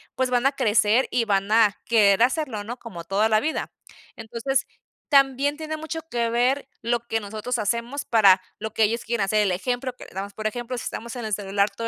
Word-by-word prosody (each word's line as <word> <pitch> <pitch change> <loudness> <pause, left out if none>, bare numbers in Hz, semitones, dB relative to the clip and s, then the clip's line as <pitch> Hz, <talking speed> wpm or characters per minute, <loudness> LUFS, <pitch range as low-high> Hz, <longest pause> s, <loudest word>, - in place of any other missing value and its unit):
pues 260 -1 0
van 245 +1 +1
a - - +2
crecer 230 -2 +2
y 240 -2 +1
van 200 -1 0
a 220 -3 +4
querer 210 -3 +4
hacerlo, 255 -5 0
¿no? 235 +4 -6
Como 175 -8 -9
toda 205 +5 +1
la 215 - +4
vida. 310 +6 -3 0.4
Entonces, 235 +4 -2 0.4
también 275 0 +3
tiene 315 0 -5
mucho 320 +1 -5
que 235 -3 0
ver 255 +4 +1
lo 235 +1 0
que 225 -1 -1
nosotros 220 +4 -4
hacemos 235 +6 -2
para 195 -5 +5 0.2
lo 220 0 -6
que 225 - +2
ellos 230 +3 0
quieran 230 -3 0
hacer, 215 +2 +1
el 195 - +1
ejemplo 245 +6 -2
que - - -12
le - - -15
damos, 200 +1 -5
por 215 +1 -3
ejemplo, 240 +3 -4
si - - -5
estamos 235 +2 -6
en 245 - -5
el 215 - -3
celular 200 0 +1
todo 230 +2 -5
230 Hz, 215 wpm, -24 LUFS, 210-255 Hz, 0.4 s, para